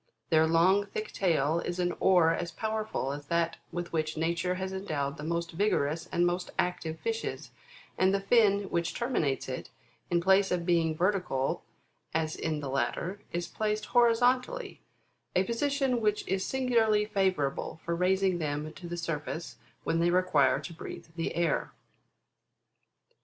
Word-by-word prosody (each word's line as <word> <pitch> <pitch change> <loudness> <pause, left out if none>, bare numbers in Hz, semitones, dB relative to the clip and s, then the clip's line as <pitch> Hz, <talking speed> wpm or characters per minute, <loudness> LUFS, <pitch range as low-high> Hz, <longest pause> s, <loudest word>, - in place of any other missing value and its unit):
Their 160 0 +5
long, 185 +5 +4
thick 215 +2 -5
tail 165 -4 +1
is 175 +1 -3
an 175 -1 0
oar 180 -4 +5
as 175 0 -3
powerful 215 -7 -2
as 145 0 -7
that 170 0 0
with 175 0 -5
which 155 -1 -1
nature 170 +3 0
has 190 +1 -4
endowed 155 -7 -2
the 145 - -7
most 170 +1 -2
vigorous 165 -3 0
and 175 - +2
most 175 +1 -1
active 175 -3 -1
fishes, 455 0 -3 0.5
and 185 +1 +4
the 195 - +2
fin 205 -1 +4
which 170 -1 -1
terminates 235 - 0
it, 130 -1 -5 0.4
in 175 - +3
place 190 +2 +4
of 175 -1 -1
being 165 -3 +2
vertical, 180 -8 0 0.5
as 160 -1 0
in 155 -2 -2
the 140 - -4
latter, 170 +10 -2
is 175 0 -2
placed 215 -1 -2
horizontally, 250 - +2 0.5
a 185 - +4
position 265 +2 0
which 210 -1 0
is 190 0 0
singularly 230 -5 +2
favourable 185 -8 0
for 170 - 0
raising 185 +1 +2
them 150 0 -3
to 180 - -9
the 175 0 -4
surface 165 0 -4 0.3
when 165 - 0
they 170 +1 +3
require 175 -7 +3
to 170 - -7
breathe 165 - -8
the 165 - -2
air. 170 -3 0
175 Hz, 155 wpm, -30 LUFS, 160-200 Hz, 0.5 s, Their